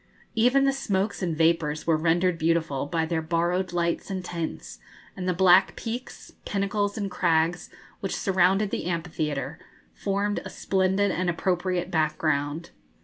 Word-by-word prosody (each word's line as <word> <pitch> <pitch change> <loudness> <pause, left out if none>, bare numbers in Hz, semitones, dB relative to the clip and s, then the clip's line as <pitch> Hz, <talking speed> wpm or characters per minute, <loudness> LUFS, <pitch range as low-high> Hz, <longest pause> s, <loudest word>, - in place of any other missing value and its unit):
Even 250 +4 +4
the 275 - +3
smokes 205 -7 -1
and 170 -4 -1
vapours 160 -2 +1
were 165 - +3
rendered 170 +2 +1
beautiful 160 -4 0
by 165 +1 0
their 160 0 -1
borrowed 175 +3 0
lights 170 +1 -1
and 190 -2 -4
tints, 170 -3 -5 0.4
and 185 -1 -3
the - - +4
black 185 +1 +5
peaks, 240 +2 -6
pinnacles, 205 +1 -1
and 200 -3 -3
crags, 170 -1 +1 0.3
which 195 - -3
surrounded 190 +2 +2
the - - -3
amphitheatre, 160 -4 -3 0.3
formed 200 +1 -1
a - - -7
splendid 190 +1 +1
and 180 0 -1
appropriate 180 +1 -1
background. 155 0 0
175 Hz, 145 wpm, -26 LUFS, 165-195 Hz, 0.4 s, black